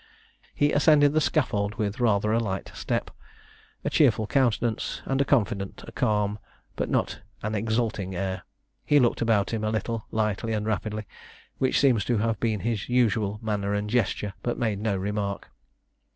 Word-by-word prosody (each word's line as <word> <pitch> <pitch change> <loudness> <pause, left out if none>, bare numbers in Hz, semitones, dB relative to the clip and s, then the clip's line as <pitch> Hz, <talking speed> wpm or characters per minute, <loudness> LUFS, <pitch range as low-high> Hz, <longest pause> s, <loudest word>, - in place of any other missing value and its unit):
He 145 0 +3
ascended 145 -1 +5
the 155 - +3
scaffold 105 -10 0
with 105 +2 -2
rather 105 -3 +2
a 115 - +3
light 95 -4 -3
step, - - -2 0.7
a - - +2
cheerful 110 - +4
countenance, 120 -2 0
and 135 0 +1
a - - +2
confident, 100 -7 0
a - - -8
calm, 105 -1 0 0.4
but - - -2
not - - -1 0.2
an 110 +1 -2
exulting 110 -3 -1
air. 95 0 -2 0.4
He 145 - +4
looked 120 -3 +2
about 115 -2 +2
him 110 -1 -1
a 110 - +1
little, 110 0 -2
lightly 110 +1 -1
and 105 -1 -1
rapidly, 110 0 -2 0.5
which 130 - +2
seems 125 -8 +4
to 120 - +1
have 115 0 0
been 110 -4 0
his 115 -2 -2
usual 110 -4 +2
manner 105 -2 -1
and 105 0 -1
gesture, 105 -4 0
but 120 - -2
made 110 -5 -1
no 105 -2 0
remark. 100 +1 -3
110 Hz, 165 wpm, -26 LUFS, 105-120 Hz, 0.7 s, ascended